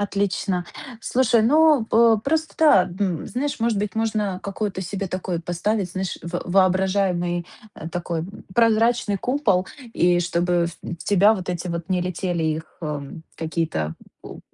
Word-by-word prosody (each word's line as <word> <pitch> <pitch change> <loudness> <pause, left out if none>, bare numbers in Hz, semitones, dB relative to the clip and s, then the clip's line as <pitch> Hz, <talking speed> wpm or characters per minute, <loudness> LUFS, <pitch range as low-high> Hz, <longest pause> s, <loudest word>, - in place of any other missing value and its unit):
Отлично. 195 -2 -1 0.4
Слушай, 235 -2 +2
ну, 300 0 +5
п 225 0 +5
просто, 315 +2 0
да, 195 - +5 0.4
знаешь, 280 +4 -3
может 230 -2 +1
быть, 210 +1 -3
можно 215 -4 -1
какое-то 200 -1 -3
себе 195 +1 -4
такое 185 -2 -3
поставить, 180 +3 -1
знаешь, 190 0 -3
во 175 +1 -4
воображаемый, 185 -2 +1 0.3
а, 160 - -7
такой 170 -1 -3 0.3
прозрачный 230 -2 +3
купол, 205 -6 +1 0.3
и 175 0 +3
чтобы, 175 0 +1 0.2
м, 170 - -4
в - - -32
тебя 205 +2 +5
вот 185 -2 -6
эти 180 0 -3
вот 170 0 -4
не 185 -2 +1
летели 175 -1 -2
их, 155 0 -3
э, 150 -2 -3 0.3
какие-то 160 - -2 0.3
у - - -10
190 Hz, 145 wpm, -23 LUFS, 175-220 Hz, 0.4 s, ну